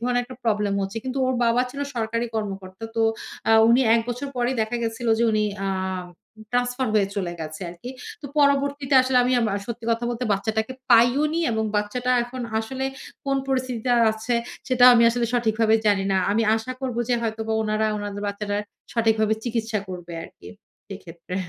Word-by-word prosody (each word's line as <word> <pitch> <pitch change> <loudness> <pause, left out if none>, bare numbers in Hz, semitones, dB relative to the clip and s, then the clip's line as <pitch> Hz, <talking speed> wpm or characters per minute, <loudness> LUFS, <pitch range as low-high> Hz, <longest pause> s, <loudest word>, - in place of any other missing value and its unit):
ধরনের 245 +1 +1
একটা 255 -1 -11
প্রবলেম 210 -3 +1
হচ্ছে। 195 +4 -4
কিন্তু 260 +1 -3
ওর 260 - +1
বাবা 235 +2 +3
ছিল 280 +2 -7
সরকারি 230 0 -1
কর্মকর্তা। 195 -1 -5
তো 225 - +3 0.5
আ - - +4 0.2
উনি 240 +3 +5
১ 230 - +4
বছর 245 +4 -3
পরেই 245 +2 0
দেখা 220 +2 -1
গেছিল 230 +1 -2
যে, - - +2
উনি 215 0 +2 0.2
আ - - 0 0.8
ট্রান্সফার 245 +1 0
হয়ে 205 -2 +4
চলে 180 -3 -2
গেছে 155 0 -6
আরকি। 180 +9 -9 0.3
তো 285 - -5
পরবর্তীতে 280 -1 +2
আসলে 255 0 0
আমা 245 -4 +2
সত্যি 235 -1 -6
কথা 230 +1 0
বলতে, 240 +1 -3
বাচ্চাটাকে 220 +4 -1 0.2
পাইওনি, 275 +8 +4
এবং 220 -1 0
বাচ্চাটা 245 +5 -1
এখন 245 +1 -7 0.2
আসলে 265 +4 -4 0.4
কোন 275 0 +1
পরিস্থিতিতে 255 -2 -1 0.2
আছে? 220 +2 -2 0.3
সেটা 250 -1 +4
আমি 235 - +5
আসলে 235 0 0
সঠিকভাবে 225 -1 +2
জানি 195 -2 +3
না। - - +2
আমি 225 +2 +2
আশা 225 +3 -3
করব 255 -3 -3
যে, 245 - +3
হয়তোবা 220 0 -2
উনারা 215 0 0
উনাদের 205 0 -5
বাচ্চাটা 205 0 -3 0.4
সঠিকভাবে 220 -2 +2
চিকিৎসা 225 -2 -1
করবে 175 -2 -7
আরকি। - - -13 0.4
সেক্ষেত্রে। 180 -2 -9
230 Hz, 170 wpm, -24 LUFS, 215-250 Hz, 0.8 s, উনি